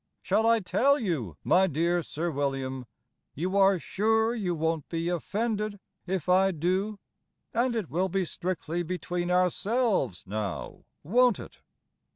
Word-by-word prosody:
Shall 220 Hz, +1 st, +2 dB
I 230 Hz, -1 st, +4 dB
tell 270 Hz, +9 st, +3 dB
you, 145 Hz, -, -2 dB
my 190 Hz, +1 st, +4 dB
dear 170 Hz, +2 st, +1 dB
Sir 165 Hz, +2 st, -3 dB
William? 135 Hz, -3 st, -2 dB, 0.5 s
You 180 Hz, +6 st, -2 dB
are 195 Hz, -1 st, +5 dB
sure 220 Hz, +5 st, +1 dB
you 190 Hz, -7 st, -1 dB
won't 160 Hz, -1 st, -1 dB
be 165 Hz, 0 st, -2 dB
offended 210 Hz, +4 st, -2 dB, 0.3 s
if 185 Hz, -3 st, -2 dB
I 190 Hz, +1 st, +5 dB
do? 190 Hz, +5 st, -1 dB, 0.6 s
And 240 Hz, +1 st, +1 dB
it 215 Hz, -6 st, -2 dB
will 185 Hz, +5 st, 0 dB
be 190 Hz, 0 st, 0 dB
strictly 175 Hz, -1 st, -3 dB
between 175 Hz, 0 st, -3 dB
ourselves, 185 Hz, -, +1 dB
now, 100 Hz, -1 st, -5 dB, 0.2 s
won't 240 Hz, +7 st, +4 dB
it? -, -, -10 dB
180 Hz, 140 wpm, -28 LUFS, 165-210 Hz, 0.6 s, are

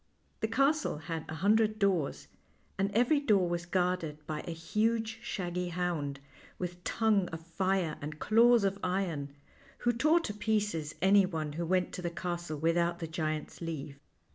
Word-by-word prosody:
The 220 Hz, -, 0 dB
castle 275 Hz, -, +2 dB
had 160 Hz, 0 st, -5 dB
a 155 Hz, -, -4 dB
hundred 215 Hz, +4 st, +3 dB
doors, 190 Hz, -8 st, 0 dB, 0.5 s
and 195 Hz, +1 st, +2 dB
every 245 Hz, +8 st, +3 dB
door 205 Hz, -10 st, +3 dB
was 175 Hz, 0 st, -2 dB
guarded 175 Hz, -4 st, -1 dB
by 150 Hz, 0 st, -4 dB
a -, -, -2 dB
huge, 220 Hz, +6 st, -1 dB
shaggy 180 Hz, -5 st, -3 dB
hound, 165 Hz, -5 st, -2 dB, 0.4 s
with 180 Hz, 0 st, -5 dB
tongue 215 Hz, -4 st, +2 dB
of 165 Hz, -1 st, -7 dB
fire 185 Hz, -2 st, 0 dB
and 150 Hz, +1 st, -5 dB
claws 230 Hz, +4 st, +5 dB
of 195 Hz, 0 st, 0 dB
iron, 170 Hz, -7 st, -2 dB, 0.4 s
who 240 Hz, -, +1 dB
tore 305 Hz, +8 st, +4 dB
to 210 Hz, -, -4 dB
pieces 210 Hz, -7 st, -1 dB
anyone 185 Hz, -6 st, +3 dB
who 170 Hz, +2 st, -3 dB
went 180 Hz, +1 st, +1 dB
to -, -, -5 dB
the 175 Hz, -, -1 dB
castle 175 Hz, -2 st, -4 dB
without 170 Hz, +2 st, +1 dB
the 170 Hz, -, -4 dB
giant's 155 Hz, -1 st, -3 dB
leave. 150 Hz, -4 st, -5 dB
180 Hz, 160 wpm, -31 LUFS, 160-210 Hz, 0.5 s, claws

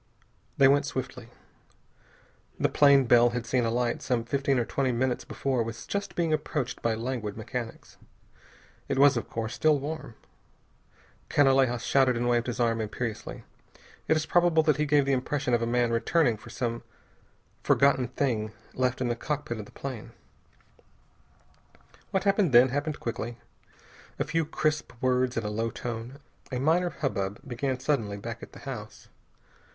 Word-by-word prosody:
They 135 Hz, -, +7 dB
went 140 Hz, +1 st, +3 dB
swiftly. 125 Hz, -3 st, -5 dB, 1.3 s
The -, -, +2 dB
plane 140 Hz, -2 st, +5 dB
Bell 120 Hz, 0 st, +6 dB
had 120 Hz, -, -4 dB
seen 120 Hz, +1 st, +1 dB
alight 120 Hz, +1 st, 0 dB
some 120 Hz, -2 st, 0 dB
fifteen 135 Hz, +2 st, 0 dB
or 120 Hz, -, +1 dB
twenty 135 Hz, +1 st, 0 dB
minutes 125 Hz, +1 st, 0 dB
before 130 Hz, -3 st, -1 dB
was 115 Hz, 0 st, -5 dB
just 200 Hz, -3 st, -4 dB
being 165 Hz, -3 st, +1 dB
approached 150 Hz, -4 st, -2 dB
by 115 Hz, -1 st, +1 dB
languid 115 Hz, -3 st, -4 dB
mechanics. 115 Hz, +1 st, -6 dB, 0.9 s
It 135 Hz, -, 0 dB
was, 140 Hz, 0 st, +6 dB
of 120 Hz, -, -3 dB
course, 115 Hz, +1 st, -3 dB
still 150 Hz, +4 st, +3 dB
warm. 145 Hz, -4 st, -6 dB, 1.1 s
Canalejas 135 Hz, -4 st, +3 dB
shouted 130 Hz, -3 st, +3 dB
and 120 Hz, +1 st, 0 dB
waved 120 Hz, 0 st, +1 dB
his 125 Hz, 0 st, -3 dB
arm 115 Hz, -1 st, +1 dB
imperiously. 110 Hz, +1 st, -5 dB, 0.6 s
It 160 Hz, -, +3 dB
is 155 Hz, -, -1 dB
probable 175 Hz, -2 st, +3 dB
that 155 Hz, -2 st, +2 dB
he 150 Hz, 0 st, 0 dB
gave 145 Hz, -1 st, +4 dB
the 140 Hz, -, +1 dB
impression 130 Hz, 0 st, -1 dB
of 120 Hz, -, +3 dB
a 115 Hz, -, 0 dB
man 120 Hz, 0 st, +1 dB
returning 120 Hz, +2 st, +2 dB
for 110 Hz, +3 st, -13 dB
some 115 Hz, -1 st, -3 dB, 0.8 s
forgotten 135 Hz, -2 st, +3 dB
thing, 115 Hz, -4 st, -1 dB, 0.2 s
left 130 Hz, 0 st, 0 dB
in 125 Hz, -, +1 dB
the 120 Hz, -, 0 dB
cockpit 135 Hz, -3 st, -3 dB
of 105 Hz, -, -6 dB
the -, -, -16 dB
plane. 130 Hz, -5 st, -7 dB, 2.0 s
What 190 Hz, -, 0 dB
happened 195 Hz, -, +2 dB
then, 125 Hz, +2 st, +7 dB
happened 145 Hz, +3 st, -2 dB
quickly. 120 Hz, 0 st, -4 dB, 0.8 s
A -, -, 0 dB
few 165 Hz, 0 st, 0 dB
crisp 155 Hz, -1 st, -1 dB
words 125 Hz, 0 st, +1 dB
in 115 Hz, -, -1 dB
a 105 Hz, -, -2 dB
low 115 Hz, +2 st, -1 dB
tone. 120 Hz, +3 st, -6 dB, 0.3 s
A 125 Hz, -, -2 dB
minor 165 Hz, +7 st, +2 dB
hubbub 115 Hz, -, -3 dB
began 130 Hz, +1 st, -2 dB
suddenly 115 Hz, -8 st, -1 dB
back 100 Hz, -, -7 dB
at -, -, -11 dB
the -, -, -11 dB
house. -, -, -8 dB
125 Hz, 160 wpm, -28 LUFS, 115-145 Hz, 2.0 s, They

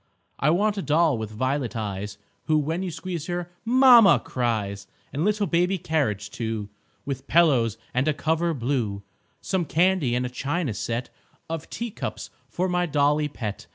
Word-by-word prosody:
I 140 Hz, -, +3 dB
want 205 Hz, +5 st, +2 dB
a -, -, -1 dB
doll 160 Hz, -2 st, +3 dB
with 110 Hz, -1 st, -4 dB
violet 130 Hz, +3 st, -2 dB
eyes 105 Hz, -2 st, -4 dB, 0.3 s
Who, 155 Hz, -1 st, +3 dB
when 160 Hz, +4 st, -1 dB
you 190 Hz, -, -2 dB
squeeze 170 Hz, -1 st, -5 dB
her, 175 Hz, 0 st, -3 dB
"Mamma!" 245 Hz, -3 st, +7 dB
cries; 105 Hz, -5 st, -2 dB, 0.3 s
And 145 Hz, -, -1 dB
little 210 Hz, +1 st, +1 dB
baby 180 Hz, +2 st, +1 dB
carriage, 110 Hz, -, -1 dB
too, 110 Hz, -3 st, -4 dB, 0.4 s
With 135 Hz, -1 st, -5 dB
pillows 130 Hz, -10 st, +3 dB, 0.2 s
and 130 Hz, +3 st, +1 dB
a 155 Hz, -, +3 dB
cover 160 Hz, +2 st, 0 dB
blue; 115 Hz, -6 st, -2 dB, 0.4 s
Some 190 Hz, -2 st, 0 dB
candy 165 Hz, -5 st, +2 dB
and 125 Hz, +1 st, 0 dB
a -, -, -3 dB
china 140 Hz, +2 st, -2 dB
set 115 Hz, +3 st, -3 dB, 0.4 s
Of 165 Hz, -2 st, -5 dB
teacups 235 Hz, -2 st, -5 dB, 0.2 s
for 185 Hz, +2 st, -1 dB
my 180 Hz, -1 st, 0 dB
dolly 150 Hz, 0 st, +2 dB
pet. 110 Hz, -, -6 dB
150 Hz, 160 wpm, -25 LUFS, 120-175 Hz, 0.4 s, Mamma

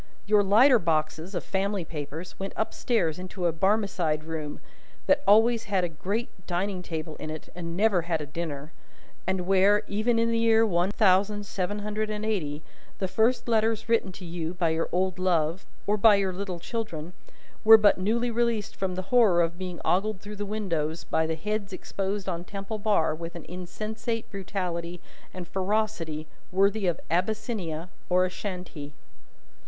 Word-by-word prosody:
Your 210 Hz, 0 st, +5 dB
lighter 230 Hz, +6 st, +6 dB
boxes 160 Hz, +2 st, -1 dB
of 175 Hz, -, -2 dB
family 195 Hz, -1 st, -1 dB
papers 155 Hz, +2 st, -6 dB
went 195 Hz, 0 st, -4 dB
up 220 Hz, -, -1 dB
stairs 180 Hz, -10 st, 0 dB
into 185 Hz, 0 st, -5 dB
a 170 Hz, -, +2 dB
Barmecide 185 Hz, -4 st, +1 dB
room, 155 Hz, -2 st, -5 dB, 0.5 s
that 285 Hz, 0 st, +4 dB
always 225 Hz, +3 st, +5 dB
had 195 Hz, -3 st, +1 dB
a 175 Hz, -, 0 dB
great 200 Hz, +9 st, -3 dB, 0.2 s
dining 185 Hz, +1 st, -1 dB
table 160 Hz, -3 st, -5 dB
in -, -, -6 dB
it 155 Hz, 0 st, -7 dB
and 170 Hz, -1 st, -5 dB
never 205 Hz, -3 st, +3 dB
had 165 Hz, -1 st, -1 dB
a 150 Hz, -, -4 dB
dinner, 150 Hz, -1 st, -5 dB, 0.6 s
and 190 Hz, -1 st, 0 dB
where, 195 Hz, +2 st, +4 dB
even 220 Hz, +3 st, +1 dB
in 230 Hz, 0 st, +2 dB
the 230 Hz, -, +1 dB
year 225 Hz, 0 st, +5 dB
one 175 Hz, -3 st, +1 dB
thousand 205 Hz, 0 st, +3 dB
seven 200 Hz, 0 st, -2 dB
hundred 215 Hz, 0 st, -2 dB
and 215 Hz, 0 st, -3 dB
eighty, 155 Hz, -9 st, -2 dB, 0.3 s
the 190 Hz, -, -1 dB
first 225 Hz, +7 st, +2 dB
letters 225 Hz, -1 st, +1 dB
written 230 Hz, -4 st, +2 dB
to 180 Hz, -, -9 dB
you 170 Hz, 0 st, -4 dB
by 175 Hz, -2 st, +1 dB
your 160 Hz, +1 st, 0 dB
old 185 Hz, +1 st, 0 dB
love, 170 Hz, -1 st, +1 dB, 0.2 s
or 210 Hz, +1 st, +2 dB
by 210 Hz, 0 st, +7 dB
your 195 Hz, -2 st, 0 dB
little 185 Hz, -1 st, -4 dB
children, 175 Hz, -6 st, -5 dB, 0.5 s
were 220 Hz, +1 st, +10 dB
but 210 Hz, -3 st, +4 dB
newly 235 Hz, +5 st, +1 dB
released 230 Hz, -3 st, 0 dB
from 190 Hz, -2 st, -2 dB
the 185 Hz, -, -3 dB
horror 205 Hz, -8 st, +6 dB
of 170 Hz, +1 st, -3 dB
being 180 Hz, -2 st, -5 dB
ogled 200 Hz, +2 st, +1 dB
through 205 Hz, +2 st, -8 dB
the 205 Hz, 0 st, -4 dB
windows, 170 Hz, -7 st, -2 dB
by 160 Hz, 0 st, 0 dB
the 160 Hz, -, -1 dB
heads 210 Hz, +4 st, -3 dB
exposed 195 Hz, +1 st, -3 dB
on 170 Hz, 0 st, -2 dB
Temple 200 Hz, +3 st, -5 dB
Bar 200 Hz, -7 st, +2 dB
with 165 Hz, +2 st, -7 dB
an 170 Hz, -, -8 dB
insensate 215 Hz, +6 st, -4 dB
brutality 180 Hz, -3 st, -3 dB, 0.3 s
and 180 Hz, -2 st, -7 dB
ferocity 190 Hz, -6 st, -1 dB, 0.3 s
worthy 195 Hz, +2 st, +2 dB
of 175 Hz, -, 0 dB
Abyssinia 180 Hz, -3 st, -1 dB, 0.2 s
or 180 Hz, 0 st, +4 dB
Ashantee. 180 Hz, -6 st, -6 dB
190 Hz, 170 wpm, -27 LUFS, 170-215 Hz, 0.6 s, were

